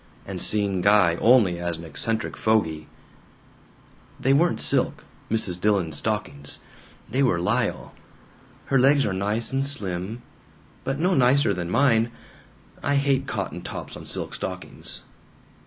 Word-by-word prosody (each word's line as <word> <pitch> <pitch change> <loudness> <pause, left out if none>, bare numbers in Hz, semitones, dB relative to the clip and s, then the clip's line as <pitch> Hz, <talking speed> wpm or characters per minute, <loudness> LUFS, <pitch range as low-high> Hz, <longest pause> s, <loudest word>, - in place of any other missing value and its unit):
And - - -4
seeing 100 -3 +3
Guy 100 -3 +5
only 110 -8 +4
as 85 -1 -2
an 85 - -10
eccentric 110 +7 -2
fogy. 80 -9 0 1.3
"They 135 - +2
weren't 170 +5 +2
silk, - - +1 0.3
Mrs. 100 -5 +1
Dillon's 95 -8 +1
stockings. 105 -10 -3 0.5
They 130 +6 -1
were 120 -11 +2
lisle. 90 - -1 0.7
Her 135 - +2
legs 140 +2 +4
are 100 - -1
nice 105 +6 -1
and 135 0 +1
slim. 110 -4 -3 0.6
But 135 0 -2
no 180 +5 +1
nicer 130 - +4
than 90 -2 -4
mine. 115 0 +3 0.7
I 140 - 0
hate 140 -1 +1
cotton 95 -6 -4
tops - - -7
on - - -10
silk - - -4
stockings. - - -7
110 Hz, 135 wpm, -24 LUFS, 90-135 Hz, 1.3 s, Guy